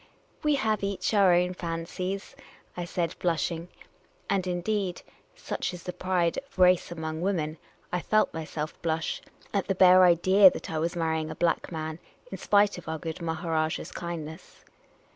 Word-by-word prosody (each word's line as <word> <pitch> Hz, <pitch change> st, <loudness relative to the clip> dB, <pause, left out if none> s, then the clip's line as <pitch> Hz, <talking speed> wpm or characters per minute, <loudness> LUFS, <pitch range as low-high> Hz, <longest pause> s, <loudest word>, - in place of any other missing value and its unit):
"We 300 Hz, -1 st, +2 dB
have 220 Hz, -6 st, 0 dB
each 200 Hz, 0 st, -1 dB
our 200 Hz, -3 st, +5 dB
own 180 Hz, +1 st, +3 dB
fancies," 180 Hz, +3 st, -4 dB, 0.4 s
I 175 Hz, -, -3 dB
said, 170 Hz, -1 st, -2 dB
blushing 170 Hz, 0 st, -1 dB, 0.3 s
— -, -, -35 dB
and, 190 Hz, -2 st, +1 dB
indeed 180 Hz, +1 st, -2 dB, 0.3 s
(such -, -, -4 dB
is 175 Hz, -, -11 dB
the 180 Hz, -, -5 dB
pride 180 Hz, -2 st, 0 dB
of 275 Hz, -5 st, -20 dB
race 180 Hz, -1 st, +4 dB
among 160 Hz, -1 st, -4 dB
women), 165 Hz, -5 st, -1 dB, 0.3 s
I 180 Hz, -, 0 dB
felt 215 Hz, +4 st, +2 dB
myself 155 Hz, -1 st, -5 dB
blush 160 Hz, -1 st, -1 dB, 0.3 s
at 200 Hz, -2 st, 0 dB
the 195 Hz, -, 0 dB
bare 185 Hz, 0 st, +7 dB
idea 185 Hz, +3 st, +7 dB
that -, -, -7 dB
I 160 Hz, -, -1 dB
was 170 Hz, +2 st, -1 dB
marrying 160 Hz, -2 st, -1 dB
a 155 Hz, -, -6 dB
black 170 Hz, +1 st, 0 dB
man, 160 Hz, 0 st, -4 dB, 0.3 s
in -, -, -6 dB
spite 205 Hz, -2 st, +3 dB
of 170 Hz, -, -10 dB
our 160 Hz, -, -2 dB
good 160 Hz, +2 st, -6 dB
Maharajah's 160 Hz, -1 st, -2 dB
kindness. 160 Hz, -3 st, -7 dB
175 Hz, 165 wpm, -28 LUFS, 160-185 Hz, 0.4 s, bare